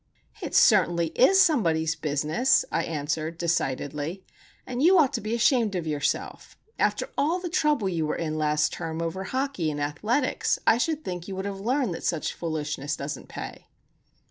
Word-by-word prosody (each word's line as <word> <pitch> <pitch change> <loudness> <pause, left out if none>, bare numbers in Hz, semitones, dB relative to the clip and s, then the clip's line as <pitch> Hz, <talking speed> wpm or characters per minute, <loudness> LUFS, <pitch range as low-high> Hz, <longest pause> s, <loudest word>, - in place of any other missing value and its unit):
"It - - -4
certainly 175 -6 +4
is 320 - +4
somebody's 165 - +3
business," 155 - +1
I 165 - 0
answered, 155 +1 -3
decidedly. 160 +1 -2 0.4
"And 250 0 -4
you 365 +5 +6
ought 290 -4 +4
to 235 - -2
be 215 +3 -2
ashamed 235 -4 +2
of 175 -2 -2
yourself. 150 -2 -3 0.2
After - - 0
all 320 +5 +2
the 360 -1 -5
trouble 300 - +1
you 165 -4 -1
were - - -1
in 155 -2 -3
last 150 -1 +1
term 165 -1 -4
over 170 +3 -3
hockey 260 - -1
and 145 -1 -4
athletics, 215 - 0
I 230 - +4
should 310 +3 -1
think 180 -1 -5
you 195 - -5
would 190 +1 -4
have 200 -1 -4
learned 245 -1 0
that - - -7
such 165 -3 -1
foolishness 150 -3 -3
doesn't 140 +1 -6
pay." - - -8
175 Hz, 170 wpm, -26 LUFS, 155-250 Hz, 0.4 s, you